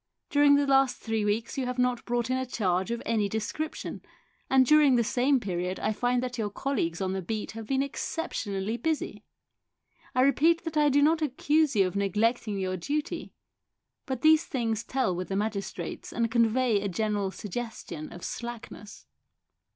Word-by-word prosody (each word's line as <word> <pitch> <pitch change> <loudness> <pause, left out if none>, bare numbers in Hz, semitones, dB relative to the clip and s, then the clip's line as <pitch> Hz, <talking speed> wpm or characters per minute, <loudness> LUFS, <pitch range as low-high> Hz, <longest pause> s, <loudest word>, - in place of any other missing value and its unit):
During 285 0 +6
the 285 0 +3
last 270 -2 +3
three 225 -2 -2
weeks 220 +5 -1
you 255 - -1
have 250 0 -3
not 250 -1 +1
brought 240 0 -1
in 255 - +2
a 260 - -1
charge 190 -4 0
of 235 0 -3
any 215 -3 +1
description, 220 +9 -4 0.5
and 265 -1 +5
during 295 -1 +6
the 235 - +3
same 255 +4 +2
period 180 -3 -3
I 215 - 0
find 245 +3 0
that 250 -1 -4
your 210 -2 -1
colleagues 200 -8 -2
on 190 0 -1
the 190 - -2
beat 215 +4 -4
have 225 -1 -8
been 270 0 +1
exceptionally 220 - -3
busy. 320 +2 -2 0.9
I 255 - +4
repeat 310 +6 +4
that 325 -1 -5
I 300 -1 +4
do 285 +1 +4
not 320 +2 +3
accuse 300 0 +1
you 195 -2 +5
of 185 - -3
neglecting 210 +2 0
your 185 -1 -2
duty, 290 - -3 0.7
but 260 -3 -3
these 315 +1 +6
things 230 -5 -2
tell 255 -8 0
with 180 +1 -4
the 195 - -1
magistrates 205 -1 -3
and 230 -1 -1
convey 230 -1 +3
a 200 - -2
general 205 +1 -1
suggestion 210 -6 -6
of 175 - -10
slackness." 235 -3 -7
235 Hz, 175 wpm, -28 LUFS, 205-270 Hz, 0.9 s, During